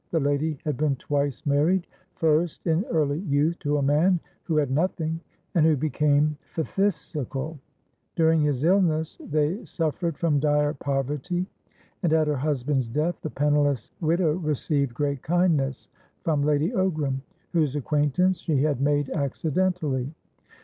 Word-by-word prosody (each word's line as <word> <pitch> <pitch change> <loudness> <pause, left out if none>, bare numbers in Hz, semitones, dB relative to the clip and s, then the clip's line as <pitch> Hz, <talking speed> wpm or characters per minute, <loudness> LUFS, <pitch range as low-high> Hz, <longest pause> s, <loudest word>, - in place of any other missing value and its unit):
The 165 - +1
lady 145 +2 0
had 150 -5 -1
been 150 -2 +1
twice 140 0 -2
married, 155 +6 +2 0.3
first 160 +1 +1
in 165 +2 +2
early 150 -2 0
youth 155 -1 +1
to 145 0 0
a 140 - 0
man 160 +6 +3 0.3
who 160 -3 0
had 145 -3 +1
nothing, 160 +1 0 0.3
and 170 -5 +3
who 155 -2 +4
became 150 +1 +2 0.2
phthisical; 160 - -2 0.6
during 160 -2 +4
his 145 -3 0
illness 165 -3 +2
they 155 +8 0
suffered 165 -1 -2
from 155 -4 +2
dire 150 0 +2
poverty 145 +6 -2 0.6
and, 170 -5 +2
at 160 -1 +4
her 150 -1 0
husband's 135 -2 0
death, 155 +8 -1
the 155 - -4
penniless 145 -4 +1
widow 165 0 +2
received 150 -4 0
great 140 -3 -1
kindness 155 -6 +1 0.4
from 155 -3 +1
Lady 150 +5 +2
Ogram, 155 - 0 0.3
whose 155 -5 +1
acquaintance 150 +5 +1
she 150 -6 +1
had 145 -4 0
made 145 0 +2
accidentally. 150 -2 -1
150 Hz, 140 wpm, -25 LUFS, 145-165 Hz, 0.6 s, who